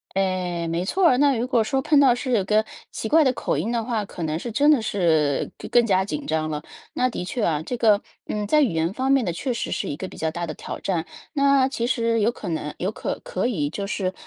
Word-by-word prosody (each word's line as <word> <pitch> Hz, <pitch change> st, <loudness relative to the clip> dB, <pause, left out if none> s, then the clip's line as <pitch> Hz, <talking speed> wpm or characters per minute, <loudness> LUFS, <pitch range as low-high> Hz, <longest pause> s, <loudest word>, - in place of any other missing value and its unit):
哎， 180 Hz, -3 st, -1 dB
没 170 Hz, +2 st, -1 dB
错 370 Hz, -, +2 dB
儿， 250 Hz, -, +4 dB
那 280 Hz, 0 st, +4 dB
如 240 Hz, -, -1 dB
果 240 Hz, -4 st, +2 dB
说 265 Hz, +4 st, 0 dB
碰 295 Hz, +2 st, +3 dB
到 265 Hz, -4 st, +6 dB
是 255 Hz, +1 st, -3 dB
有 210 Hz, -5 st, +2 dB
个 215 Hz, +2 st, +3 dB, 0.3 s
奇 220 Hz, -, -4 dB
怪 315 Hz, +2 st, +5 dB
的 260 Hz, -, +3 dB
口 -, -, -2 dB
音 230 Hz, -, -1 dB
的 235 Hz, -1 st, 0 dB
话， 225 Hz, -2 st, -2 dB
可 185 Hz, -3 st, -8 dB
能 155 Hz, 0 st, -1 dB
是 230 Hz, +5 st, -6 dB
真 290 Hz, +6 st, +4 dB
的 285 Hz, -7 st, +4 dB
是 160 Hz, -9 st, +1 dB
更 -, -, -9 dB
更 240 Hz, -1 st, +4 dB
加 190 Hz, -2 st, +2 dB
紧 285 Hz, +8 st, -5 dB
张 155 Hz, 0 st, -1 dB
了。 150 Hz, -1 st, -3 dB, 0.3 s
那 255 Hz, -, +1 dB
的 210 Hz, -, -5 dB
确 235 Hz, +4 st, -3 dB
啊， 155 Hz, -4 st, +1 dB
这 245 Hz, +8 st, -4 dB
个， 215 Hz, -3 st, +4 dB, 0.2 s
嗯， 210 Hz, -1 st, -2 dB
在 305 Hz, +7 st, +4 dB
语 270 Hz, -, +2 dB
言 165 Hz, +3 st, 0 dB
方 260 Hz, +4 st, -1 dB
面 270 Hz, -3 st, +4 dB
呢， 175 Hz, -, -1 dB
确 250 Hz, +9 st, -3 dB
实 230 Hz, -, -3 dB
是 -, -, -2 dB
一 145 Hz, -, -3 dB
个 190 Hz, -, -5 dB
比 -, -, -12 dB
较 160 Hz, 0 st, -1 dB
大 170 Hz, +1 st, -4 dB
的 155 Hz, -, -4 dB
挑 -, -, -7 dB
战。 175 Hz, -4 st, -1 dB, 0.3 s
那 280 Hz, -3 st, +4 dB
其 240 Hz, -3 st, -2 dB
实 230 Hz, -2 st, +1 dB
有 215 Hz, +3 st, +3 dB
可 210 Hz, -6 st, -7 dB
能 155 Hz, -2 st, -3 dB
有 190 Hz, +4 st, -2 dB
可 -, -, -4 dB
可 -, -, -2 dB
以， 155 Hz, -12 st, -1 dB
就 200 Hz, +5 st, -4 dB
是 190 Hz, -2 st, -2 dB
215 Hz, 285 characters per minute, -23 LUFS, 175-255 Hz, 0.3 s, 到